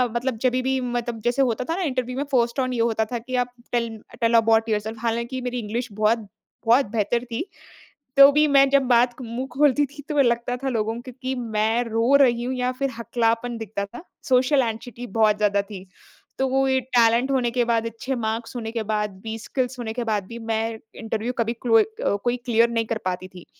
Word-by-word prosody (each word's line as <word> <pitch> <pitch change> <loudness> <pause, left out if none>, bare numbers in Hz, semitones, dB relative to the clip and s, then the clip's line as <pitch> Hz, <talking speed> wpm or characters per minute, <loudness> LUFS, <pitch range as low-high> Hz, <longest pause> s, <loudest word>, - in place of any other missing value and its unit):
मतलब 240 -1 -1
जभी 255 0 +2
भी 265 +1 0
मतलब 240 -2 -3
जैसे 240 +3 +1
होता 250 -1 +1
था 330 - +1
ना 380 - -3
इंटरव्यू 255 -4 -2
में 285 - 0
फर्स्ट 240 0 +1
ऑन 255 -1 0
यू 230 -1 +1
होता 220 -1 0
था, 240 +1 -4
कि 255 +2 -5
आप 245 0 +1 0.2
टेल 235 -2 -1 0.2
टेल 230 0 +2
अबाउट 225 0 +3
योरसेल्फ, 215 +1 -2
हालाँकि 235 +2 -2
मेरी 250 0 -3
इंग्लिश 230 +2 -4
बहुत 215 +1 +1 0.4
बहुत 240 +4 +5
बेहतर 235 +2 0
थी। 240 - -4 0.7
तो 275 +1 +10
भी 300 +1 +4
मैं 275 -1 +5
जब 280 0 +4
बात 245 0 +4
क - - -7
मुँह 245 +2 -4
खोलती 290 +1 +3
थी, 290 +2 -12
तो 295 -1 0
लगता 240 -1 +1
था 270 +1 -3
लोगों 225 -1 -1
को 255 - -10
कि 260 0 -2
मैं 225 0 0
रो 230 +3 +2
रही 240 -3 +3
हूँ 255 +2 -2
या 250 0 0
फिर 275 +2 -2
हकलापन 230 0 0
दिखता 210 -2 -4
था, 240 +10 -11 0.3
सोशल 260 +2 +4
एंग्जायटी 235 +1 -5
बहुत 210 -1 +4
ज़्यादा 205 -1 +2
थी। 195 -2 -10 0.5
तो 265 - +2
वो 270 +1 +2
ये 265 0 +3 0.2
टैलेंट 235 +2 +4
होने 250 -3 +1
के 245 0 +1
बाद, 230 -1 +1
अच्छे 230 +4 -4
मार्क्स 225 +1 -3
होने 225 -2 -4
के 230 -1 -2
बाद 210 -1 -1
भी, 225 0 -4
स्किल्स 255 +2 -3
होने 225 -2 -3
के 245 +1 -3
बाद 215 -4 -1
भी 235 - -8
मैं 225 0 -2 0.2
इंटरव्यू 225 +1 -3
कभी 230 0 0
कलोई 225 -2 +5
अ, 440 - -2
कोई 245 0 +1
क्लियर 235 0 +3
नहीं 230 -1 0
कर 225 0 -2
पाती 185 0 -2
थी। 180 -2 -13
235 Hz, 220 wpm, -23 LUFS, 225-255 Hz, 0.7 s, तो